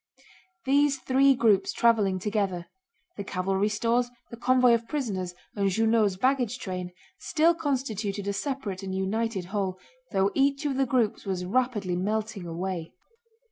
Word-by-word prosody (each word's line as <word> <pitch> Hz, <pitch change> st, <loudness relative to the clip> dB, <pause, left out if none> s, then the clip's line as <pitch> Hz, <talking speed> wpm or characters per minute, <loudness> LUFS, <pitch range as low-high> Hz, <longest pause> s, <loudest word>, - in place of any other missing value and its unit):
These 280 Hz, +1 st, +3 dB
three 270 Hz, +1 st, +4 dB
groups 215 Hz, -5 st, +3 dB
traveling 215 Hz, -5 st, +3 dB
together—the 205 Hz, -, -5 dB
cavalry 195 Hz, +2 st, 0 dB
stores, 235 Hz, +3 st, +1 dB, 0.2 s
the -, -, -6 dB
convoy 250 Hz, +1 st, +4 dB
of 230 Hz, 0 st, 0 dB
prisoners, 195 Hz, -, -3 dB, 0.2 s
and 200 Hz, -1 st, +1 dB
Junot's 220 Hz, 0 st, +2 dB
baggage 255 Hz, 0 st, +1 dB
train—still 185 Hz, -, -1 dB
constituted 225 Hz, -, -2 dB
a 200 Hz, -, 0 dB
separate 230 Hz, -6 st, -3 dB
and 190 Hz, -1 st, -4 dB
united 195 Hz, 0 st, -1 dB
whole, 190 Hz, -3 st, -1 dB, 0.3 s
though 195 Hz, +1 st, +2 dB
each 280 Hz, +2 st, +1 dB
of 280 Hz, -2 st, 0 dB
the 270 Hz, -1 st, +2 dB
groups 240 Hz, -5 st, 0 dB
was 180 Hz, -2 st, -2 dB
rapidly 210 Hz, -4 st, 0 dB
melting 210 Hz, 0 st, -2 dB
away. 170 Hz, 0 st, -4 dB
215 Hz, 135 wpm, -27 LUFS, 190-255 Hz, 0.3 s, three